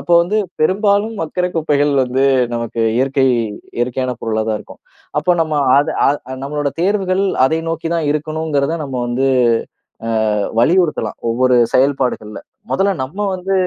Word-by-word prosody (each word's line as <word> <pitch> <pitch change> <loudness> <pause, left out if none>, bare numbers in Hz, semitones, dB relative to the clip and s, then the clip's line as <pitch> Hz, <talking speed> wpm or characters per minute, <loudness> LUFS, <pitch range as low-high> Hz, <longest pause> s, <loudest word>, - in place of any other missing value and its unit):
அப்போ 175 - -2
வந்து 200 +5 -1 0.2
பெரும்பாலும் 205 +5 +2
மக்கிற 180 +3 -1
குப்பைகள் 145 -2 +1
வந்து 130 +2 -1 0.3
நமக்கு 115 0 -3 0.2
இயற்கை 135 0 +2 0.5
இயற்கையான 125 +1 -1
பொருளா 110 -1 -1
தான் 110 -1 0
இருக்கும். - - -14 0.4
அப்ப 175 +4 +2
நம்ம 155 -1 0 0.2
அத 145 +3 +1 0.2
அத 140 - +3 0.2
அ 130 - -3
நம்மளோட 145 +1 -2
தேர்வுகள் 190 0 +1 0.2
அதை 160 +5 +1
நோக்கி 165 0 -3
தான் 165 -3 -1
இருக்கணுங்கிறத 155 0 -1
நம்ம 135 -2 -5
வந்து, 125 +3 0 0.8
அ - - -2 0.5
வலியுறுத்தலாம். 155 - +1
ஒவ்வொரு 125 +2 +2 0.2
செயல்பாடுகள்ல, 130 -5 0 0.3
முதல்ல 195 +1 +2
நம்ம 140 +9 -9 0.2
வந்து 185 +2 -3
150 Hz, 140 wpm, -17 LUFS, 130-175 Hz, 0.8 s, அத